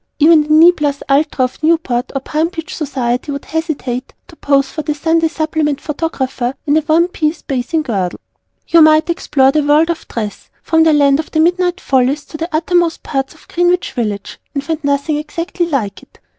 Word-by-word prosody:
Even 315 +1 +6
the 300 - -6
"Knee 320 +3 +7
plus 290 -4 -2
ultra" 280 -2 +2
of 255 - -8
Newport 310 -7 0
or 270 - -1
Palm 310 +4 -1
Beach 340 0 -7
Society 260 -3 -2
would 280 0 -6
hesitate 285 -6 -4
to 345 - -15
pose 275 -3 +1
for 310 - -5
the 300 0 -3
Sunday 325 +2 +1
Supplement 315 -3 -1
Photographer 270 -5 -3
in 290 -1 +2
a - - +5
one 325 +3 +2
piece 315 -3 -2
Bathing 275 +4 -2
Girdle. 195 -9 -2 0.5
You 335 - +5
might 310 +2 +5
explore 270 -5 +2
the 305 +1 +1
World 300 +3 +3
of 335 - -7
Dress, 215 -3 -6
from 320 -1 +2
the 320 0 +5
Land 285 -1 +4
of 315 - -4
the 315 - -1
Midnight 355 +2 +2
Follies 270 +1 +1
to 310 - -9
the 330 +2 -4
Uttermost 335 +1 0
parts 270 +1 -3
of - - -21
Greenwich 350 +1 +1
Village 210 -6 -4 0.2
and 280 - -2
find 315 +1 -4
nothing 285 +2 0
exactly 335 +3 -3
like 225 - -2
it. - - -21
305 Hz, 195 wpm, -16 LUFS, 275-325 Hz, 0.5 s, Knee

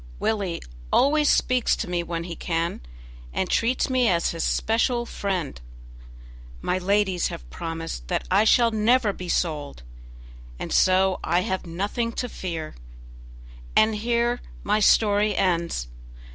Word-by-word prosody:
Willie 200 -6 -1 0.3
always 295 +2 +4
speaks 250 -1 +2
to - - -4
me 175 -1 -1
when 170 -1 -4
he 170 -1 -6
can, 165 0 -2 0.5
and 190 - -1
treats 235 +6 +1
me 255 -2 +2
as 170 -4 +2
his 165 -1 -3
special 235 +2 +1
friend. 185 - -3 1.0
My 180 - -1
ladies 190 -1 +1
have - - -8
promised 165 - -5
that - - -1
I 200 +3 +5
shall 230 +1 +4
never 220 0 +2
be 180 -2 -8
sold, 150 - -2 0.7
and - - -5
so 185 0 +3
I 175 - +2
have 190 -1 -3
nothing 205 +7 -2
to 245 - -3
fear; 165 -8 -5 1.0
and 220 0 +5
here 235 +2 0 0.2
my 210 +1 +2
story 210 -1 +3
ends. 170 - 0
190 Hz, 135 wpm, -24 LUFS, 170-225 Hz, 1.0 s, I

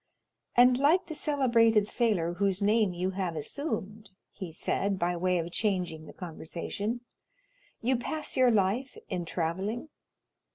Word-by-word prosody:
"And 250 +1 +6
like 310 +7 +4
the 320 - -6
celebrated 235 -8 +3
sailor 205 -8 +1
whose 195 +1 +1
name 210 -1 +3
you 180 +2 -2
have 185 -3 -2
assumed," 210 - -4 0.2
he 185 -5 -7
said, 195 +4 -1
by 175 0 0
way 180 +1 +1
of 170 0 -3
changing 180 -6 -1
the - - -9
conversation, 185 +6 -4 0.8
"you 255 +3 +3
pass 305 +5 -4
your 255 -2 +5
life 220 +5 +1
in 180 -3 -2
travelling?" 190 - -2
200 Hz, 135 wpm, -29 LUFS, 180-240 Hz, 0.8 s, And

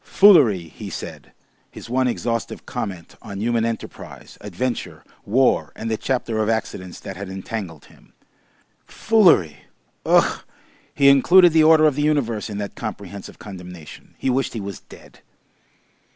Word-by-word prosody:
"Foolery!" 150 - +5
he - - -9
said, - - -8 0.4
his - - -11
one 130 +2 +1
exhaustive 115 -1 -3
comment 90 -4 -6
on 100 -2 -8
human 115 +1 0
enterprise, 115 -1 -6
adventure, 105 +6 -4 0.2
war, 130 +5 +2
and 115 +1 -5
the - - +1
chapter 120 -3 -2
of 110 0 0
accidents 95 -5 -3
that 95 - -8
had 100 +1 -7
entangled 95 -4 -7
him. - - -22 0.7
"Foolery! 170 - +3 0.5
Ugh!" - - +2 0.5
He 140 - +4
included 170 +6 +6
the 160 -1 +5
order 155 0 +6
of 150 - +4
the 145 - -2
universe 130 -8 0
in 105 - -5
that 100 -1 -5
comprehensive 100 -2 -8
condemnation. 90 -5 -11
He 130 - -1
wished 135 +2 -1
he 115 - -4
was 100 -2 -7
dead. - - -17
115 Hz, 145 wpm, -21 LUFS, 100-135 Hz, 0.7 s, included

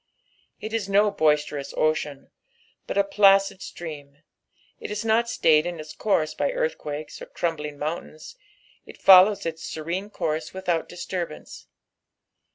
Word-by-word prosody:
It 220 - -7
ia 225 - +1
no 205 +1 +4
boisterous 150 -5 0
ocean, 150 -3 -1 0.6
but - - -3
a 200 - +5
placid 195 -1 +4
stream, 145 -3 -9 0.6
it - - -7
ia 210 +2 -4
not 225 +2 +3
Bts;ed 160 -8 +3
in 175 -2 -5
its 155 0 -9
courHi 160 -7 0
by - - +1
earthquakes 155 - -4
or - - -8
crumbling 150 -4 -3
mountains, 155 0 -6 0.5
it - - -14
follows 195 +2 +7
its 165 0 -4
serene 170 +6 -4
course 160 -4 -3
without 180 -4 -1
diaturbance. 175 -2 -6
170 Hz, 135 wpm, -24 LUFS, 155-200 Hz, 0.6 s, follows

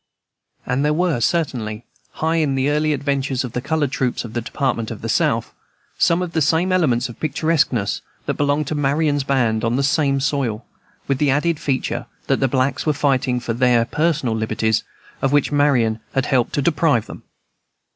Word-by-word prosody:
And 125 +3 0
there 150 +1 +2
were, 170 -6 +1
certainly, 120 -8 -1 0.3
hi 160 0 0
the 135 -1 +1
early 155 +1 +1
adventures 140 -2 -1
of 125 - -5
the 125 - -3
colored 150 -1 -1
troops 125 -2 -1
in 115 - -9
the 120 - -1
Department 120 -2 -2
of - - -8
the - - -2
South, - - +1 0.5
some 170 +2 +3
of 175 - -5
the 160 - 0
same 160 +5 +2
elements 150 -10 +2
of 120 - -12
picturesqueness 145 -8 0 0.2
that - - 0
belonged 145 +1 0
to - - -1
Marion's 145 0 +1
band, 120 -5 +1
on 115 +1 +1
the 140 - +1
same 140 -1 +2
soil, 135 -6 -1 0.4
with 135 -1 0
the 150 - +2
added 150 +3 +1
feature 135 -2 -2 0.2
that - - +1
the 135 - +2
blacks 130 +1 0
were 155 - +3
fighting 130 -3 +1
for 120 -1 -3
their 120 -1 +3
personal 150 -4 0
liberties, 110 0 0 0.4
of 135 - +1
which 145 0 +2
Marion 130 -7 +2 0.2
had 135 0 +1
helped 130 -5 +1
to 145 - 0
deprive 145 -7 +2
them. - - -10
140 Hz, 185 wpm, -20 LUFS, 125-150 Hz, 0.5 s, some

